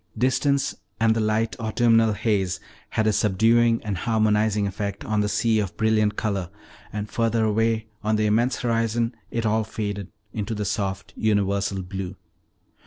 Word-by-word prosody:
Distance, 140 +2 +1 0.3
and 110 0 +3
the - - 0
light, 110 +1 +1
autumnal 115 0 +3
haze, 100 -4 0 0.3
had 110 - 0
a 110 - +3
subduing 115 +4 +3
and 100 -5 -3
harmonizing 110 -1 +2
effect 100 +1 -4
on 110 -1 0
the 105 - 0
sea 110 +1 +2
of 100 -4 -3
brilliant 110 -1 +2
color, 100 -6 -2 0.4
and 105 0 -4
further 115 0 +1
away 110 +1 +1 0.2
on 110 +1 +2
the 105 0 +1
immense 115 +5 +2
horizon 115 0 0 0.2
it 115 -1 -2
all 110 +1 +2
faded 100 -3 -4 0.2
into 110 +1 -3
the 105 0 -2
soft 100 -1 -3
universal 100 -2 0
blue. 95 +1 -5
110 Hz, 155 wpm, -24 LUFS, 100-115 Hz, 0.4 s, and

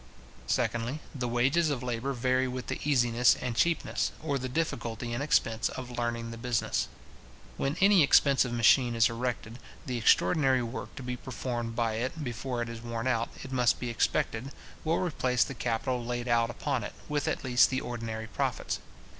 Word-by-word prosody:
Secondly, 120 - 0
the 125 -4 -3
wages 135 +8 +2
of 135 -4 -2
labour 125 +2 -2
vary 130 +1 +1
with 125 0 -5
the - - -4
easiness 125 -4 +4
and 125 -2 -3
cheapness, 170 +6 +1
or 140 -3 0
the 130 0 -4
difficulty 120 -5 -2
and 120 - -2
expense, 115 -6 +1
of 125 -1 -7
learning 115 -1 -2
the 115 - -8
business. 120 -1 0 0.7
When 140 +4 -1
any 195 -2 +6
expensive 140 -3 +4
machine 120 +1 +4
is 115 0 +4
erected, 115 -1 -4 0.3
the 125 -2 -2
extraordinary 130 - +4
work 120 +2 -6
to 140 - -7
be 125 0 -4
performed 120 -2 -4
by 115 -2 0
it 130 +7 -3
before 120 0 -3
it - - -6
is 115 -1 -7
worn 115 0 -4
out, 115 -3 +1
it 135 - -8
must 125 -2 +2
be 120 -1 -3
expected, 115 +2 0 0.3
will 165 +1 +1
replace 130 -8 +1
the 135 - -6
capital 120 +1 -1
laid 120 +1 -3
out 115 -1 +3
upon 130 0 -2
it, - - -6
with 145 -1 -1
at - - -1
least 125 -2 +5
the 130 0 -1
ordinary 115 -2 -4
profits. 110 - -2
125 Hz, 180 wpm, -29 LUFS, 115-130 Hz, 0.7 s, any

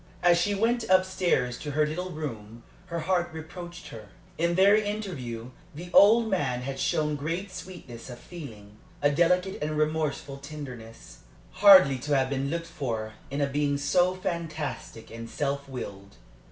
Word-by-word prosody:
As 175 -1 +5
she 205 +3 +1
went 230 +2 0
up 185 0 +5
stairs 175 -10 0
to 150 - -6
her 150 +1 +2
little 180 +5 -4
room 115 -8 -7 0.2
her 170 -2 -3
heart 175 0 0
reproached 170 +2 -9
her. 110 -3 -10 0.3
In 170 +1 +1
their 195 +3 +6
interview 175 - -3 0.2
the 175 +3 -8
old 225 +3 +7
man 130 - -1
had 135 +1 -5
shown 150 +1 +1
great 165 +7 -3
sweetness 175 -11 -9
of 120 - -8
feeling, 110 - -11 0.3
a 145 - +5
delicate 180 +5 +2
and 155 +1 -2
remorseful 150 -2 -1
tenderness, 140 -6 -10 0.3
hardly 185 -10 +7
to 145 +3 0
have 130 0 0
been 135 0 -1
looked 165 +2 -2
for 115 -9 -4 0.2
in 140 +2 -2
a - - +3
being 145 0 0
so 180 +6 +2
fantastic 160 -10 -5
and 115 0 -8
self 140 -1 -2
willed. 100 -6 -8
155 Hz, 160 wpm, -27 LUFS, 130-180 Hz, 0.3 s, old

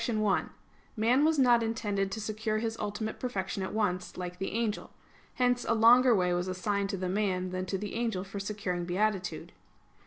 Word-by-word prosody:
1: 215 -3 +1 0.5
Man 240 +5 +3
was 315 0 +3
not 245 -3 +5
intended 205 -4 -1
to 220 - -4
secure 215 0 -2
his 225 0 -2
ultimate 210 +1 -4
perfection 200 -5 -3
at 190 - -3
once, 185 -4 -1
like 180 0 -6
the 195 - -2
angel. 225 -2 -2 0.5
Hence 245 -1 +2
a 230 - +1
longer 240 +2 +6
way 180 -2 +2
was 175 +1 -1
assigned 195 +2 -1
to 195 - -2
man 185 -2 -1
than 185 0 -3
to 195 - -1
the 205 +1 -5
angel 225 -5 -1
for 200 +1 -7
securing 195 -3 -3
beatitude. 185 0 -1
210 Hz, 180 wpm, -30 LUFS, 190-225 Hz, 0.5 s, longer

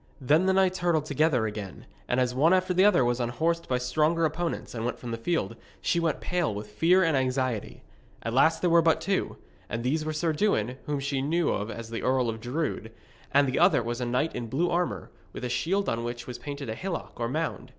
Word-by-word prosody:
Then 150 +7 +3
the 190 - +4
knights 190 -1 +2
hurtled 170 -4 +1
together 145 -5 +2
again, 105 -3 -6 0.2
and 125 - +1
as 125 -1 +1
one 160 +8 +4
after 185 0 +1
the 185 +1 +4
other 205 -11 +5
was 120 +1 0
unhorsed 160 +8 -1
by 125 - +2
stronger 155 +6 +1
opponents 170 +2 -3
and 115 -2 -4
went 120 - -2
from 120 - -7
the - - -1
field, 115 - -1 0.2
she 170 - +1
went 165 -2 0
pale 175 -7 0
with 105 0 -7
fear 175 - +4
and 165 -3 +2
anxiety. 130 -4 -1 0.4
At 115 - -3
last 160 +5 +4
there 180 - +2
were 170 0 +6
but 165 0 +3
two, 195 -1 -1 0.3
and 115 0 -3
these 150 +5 0
were 155 - -2
Sir 155 +1 0
Dewin, 130 - 0
whom 145 -1 -1
she 140 -1 -1
knew 165 +4 +1
as 115 0 -7
the 115 - -3
Earl 130 -2 +1
of 110 0 -4
Drood, 125 -3 -3 0.4
and 140 0 +4
the 130 - 0
other 170 -7 +4
was 120 +2 -3
a - - 0
knight 125 +7 0
in 120 -1 -4
blue 165 +9 0
armour, 170 - -1 0.2
with - - -7
a - - -2
shield 190 +10 0
on 115 0 -1
which 120 0 -5
was 125 - -7
painted 140 -1 -6
a 110 - -2
hillock 170 +5 -5
or 115 0 -1
mound. 155 -2 -3
140 Hz, 230 wpm, -27 LUFS, 120-170 Hz, 0.4 s, were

